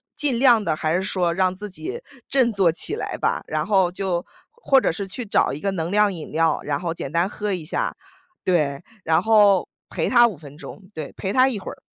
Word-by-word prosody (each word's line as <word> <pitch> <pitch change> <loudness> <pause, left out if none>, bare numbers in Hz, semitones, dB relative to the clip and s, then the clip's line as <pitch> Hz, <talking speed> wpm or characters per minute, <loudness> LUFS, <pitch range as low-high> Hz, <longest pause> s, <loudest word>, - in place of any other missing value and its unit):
尽 265 -5 0
量 240 -5 +5
地 160 - 0
还 155 +1 -1
是 185 - 0
说 180 -3 0
让 185 +1 +1
自 205 +2 -8
己 385 - -7 0.3
振 260 -3 +3
作 195 -6 +2
起 385 - -3
来 - - -4
吧， - - 0
然 - - -2
后 190 -4 +3
就 180 -1 -2 0.3
或 455 - +3
者 - - 0
是 200 +3 -4
去 220 +6 -6
找 200 - +2
一 140 - -5
个 195 +4 -1
能 170 -2 -3
量 210 -1 +3
饮 165 -4 -8
料， 160 0 +1
然 145 -1 -2
后 170 -2 -3
简 140 -4 -6
单 170 +3 +1
喝 205 0 -4
一 170 -4 -4
下。 - - -2 0.5
对， 150 -6 +1 0.2
然 160 - +2
后 205 -4 +4 0.2
陪 - - -2
她 240 -1 +6
5 215 -7 -1
分 145 -1 -13
钟， 180 - -10
对， 155 -3 -7
陪 190 0 -3
她 260 +1 +5
一 230 -6 -4
会 - - -7
儿。 - - -18
190 Hz, 240 characters per minute, -22 LUFS, 165-220 Hz, 0.5 s, 她